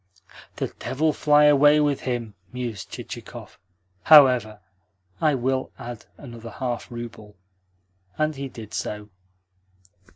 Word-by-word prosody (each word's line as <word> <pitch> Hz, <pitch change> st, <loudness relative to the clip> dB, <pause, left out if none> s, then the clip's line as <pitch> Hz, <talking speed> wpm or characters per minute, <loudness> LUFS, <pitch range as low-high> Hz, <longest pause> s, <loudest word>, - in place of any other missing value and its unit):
"The -, -, -3 dB
devil 155 Hz, +4 st, 0 dB
fly 150 Hz, 0 st, +4 dB
away 145 Hz, +1 st, +6 dB
with 145 Hz, -2 st, +1 dB
him!" 120 Hz, -4 st, -3 dB, 0.2 s
mused 120 Hz, -5 st, -5 dB
Chichikov. -, -, -9 dB, 0.5 s
"However, 125 Hz, -8 st, +6 dB, 0.6 s
I 155 Hz, -3 st, +3 dB
will 130 Hz, +1 st, -1 dB
add 120 Hz, -2 st, -8 dB
another 115 Hz, -4 st, -10 dB
half 120 Hz, +1 st, -4 dB
rouble." 115 Hz, -3 st, -9 dB, 0.8 s
And 155 Hz, 0 st, 0 dB
he 135 Hz, 0 st, -5 dB
did 110 Hz, -4 st, -11 dB
so. 105 Hz, 0 st, -5 dB
125 Hz, 110 wpm, -24 LUFS, 115-145 Hz, 0.8 s, away